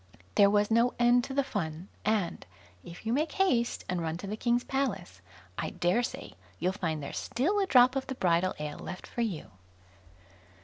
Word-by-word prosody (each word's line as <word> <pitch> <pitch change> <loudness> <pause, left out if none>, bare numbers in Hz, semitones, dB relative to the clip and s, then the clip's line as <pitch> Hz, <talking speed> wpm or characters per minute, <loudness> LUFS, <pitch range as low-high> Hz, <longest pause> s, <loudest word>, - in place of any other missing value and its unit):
There 200 -1 +6
was 205 +1 +2
no 235 +2 +3
end 240 0 +4
to 270 - -6
the 280 - +3
fun; 175 - -4 0.2
and, 210 -5 0 0.4
if 170 +5 -11
you 225 - 0
make 305 +4 0
haste 250 -12 +1
and 180 -1 -1
run 160 0 -2
to 180 - -8
the 205 +2 -3
King's 240 +2 +1
palace, 270 0 -2 0.4
I - - -1
dare 180 +7 +1
say 240 - -5 0.2
you'll 180 +3 0
find 160 -6 -2
there's 140 - -4
still 330 - 0
a 390 - +1
drop 255 -2 +6
of 270 - -2
the 265 - -4
bridal 180 -2 +2
ale 150 0 -5
left 185 - -7
for 240 - -4
you. 200 -10 -3
220 Hz, 190 wpm, -30 LUFS, 175-250 Hz, 0.4 s, There